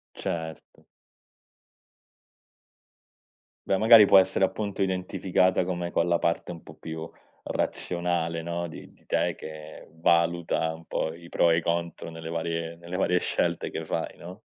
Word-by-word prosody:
Certo. 80 -2 -6 2.8
Beh, 95 - +2
magari 110 -1 +9
può 95 - +8
essere 95 0 +3
appunto 100 0 -2
identificata 95 -1 +1
come 85 -1 -2
con 85 0 +1
la 85 -1 +2
parte 85 +1 -1
un 85 - -9
po' - - -13
più 80 0 -7 0.4
razionale, 85 -2 -1
no, 85 0 -3
di 80 - -11
di - - -28
te - - +1
che 80 0 -10
valuta 85 0 +1
un 80 0 -14
po' 80 - -2
i 85 0 -13
pro 85 - +3
e 80 - +4
i - - +1
contro 85 0 -2
nelle 80 0 -7
varie 85 0 -3
nelle 85 +2 -8
varie 90 -1 +2
scelte 85 -1 -1
che 80 - -4
fai, 80 - -3
no? 90 +5 -10
85 Hz, 150 wpm, -27 LUFS, 80-90 Hz, 2.8 s, magari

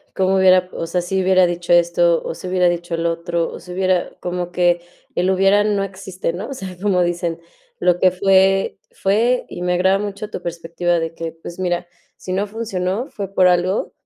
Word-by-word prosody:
cómo 190 0 +2
hubiera, 185 -1 +5
o - - -4
sea, 180 +2 -1
si 190 +2 -1
hubiera 185 -1 +4
dicho 175 0 -1
esto 170 0 +3
o - - -4
si 185 - -8
hubiera 180 -1 +3
dicho 175 0 -3
el 165 0 0
otro, 170 0 -2
o - - -8
si 180 - -11
hubiera 185 0 0
como 180 0 -4
que 175 -1 +2 0.3
el 180 +2 +2
hubiera 195 +2 +4
no 205 -1 +1
existe, 190 -2 -4
¿no? 175 +4 -6
O - - -4
sea, 190 -7 -8
como 190 -2 +2
dicen: 175 -1 -1 0.4
"Lo 180 -1 +3
que 185 - +5
fue, 195 +1 +3
fue". 230 +6 +1
Y 175 - -6
me 180 0 +1
agrada 190 +2 +3
mucho 205 +1 -5
tu 185 - -7
perspectiva 170 +1 -1
de 165 0 -4
que, 165 -1 -5
pues, 165 +1 -10
mira, 175 -1 -1 0.3
si 185 - -8
no 195 +2 0
funcionó, 210 +1 -3
fue 195 -2 -6
por 185 -1 +5
algo 180 +2 +1
180 Hz, 205 wpm, -20 LUFS, 175-195 Hz, 0.4 s, hubiera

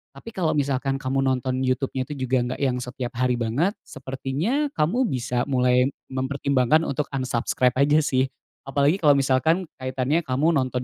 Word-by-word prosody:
Tapi 140 - -10
kalau 170 -7 0
misalkan 135 -1 0
kamu 135 0 -2
nonton 130 0 0
YouTube-nya 130 0 -1
tuh 145 - -4
juga 130 0 0
nggak 125 +1 -3
yang 125 -2 +1
setiap 125 0 -5
hari 125 -1 +2
banget 135 - 0
sepertinya 135 - -2
kamu 195 +13 +1
bisa 125 - -1
mulai 125 -1 +2 0.2
mempertimbangkan 135 +2 +1
untuk 145 +2 -1
unsubscribe 125 -1 0
aja 145 +3 +4
sih 130 -3 +1 0.4
apalagi 140 +6 +2
kalau 145 -5 +5
misalkan 140 +7 +2 0.2
kaitannya 130 +4 0
kamu 140 +6 +2
nonton 130 -4 0
130 Hz, 155 wpm, -24 LUFS, 130-145 Hz, 0.4 s, kalau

